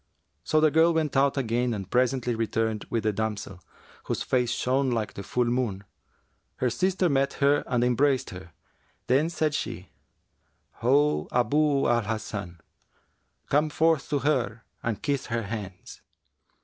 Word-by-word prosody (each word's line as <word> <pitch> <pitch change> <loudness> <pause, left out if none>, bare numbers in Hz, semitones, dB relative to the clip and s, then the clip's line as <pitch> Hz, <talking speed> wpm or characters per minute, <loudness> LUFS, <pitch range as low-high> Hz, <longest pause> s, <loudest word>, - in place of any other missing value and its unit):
So 155 - +2
the 155 -1 +4
girl 165 +2 +4
went 155 -3 0
out 140 +1 +3
again 120 -1 0
and 95 -3 -6
presently 125 +2 +1
returned 110 -1 -1
with 115 -2 -1
the 110 -1 +1
damsel, 105 -3 -4 0.4
whose - - -2
face 125 -2 +1
shone 130 +3 +1
like 110 -4 -2
the - - -7
full 125 +4 0
moon. 120 -5 -1 0.7
Her 125 -1 0
sister 185 +6 +1
met 140 -2 +1
her 145 +1 +2
and 125 -2 +1
embraced 130 +2 +2
her; 90 -2 -10 0.5
then 140 +6 +2
said 155 -3 -1
she, 90 -9 -4 0.9
'Ho, 135 - +2
Abu 145 +3 +2
al 120 0 +3
Hasan, 105 -5 -5 0.9
come 150 +2 +3
forth 160 -1 +1
to 145 - +1
her 125 -5 -1 0.2
and 115 -3 -3
kiss 140 -2 -1
her 115 -1 -2
hands!' 100 -3 -7
125 Hz, 150 wpm, -26 LUFS, 110-145 Hz, 0.9 s, the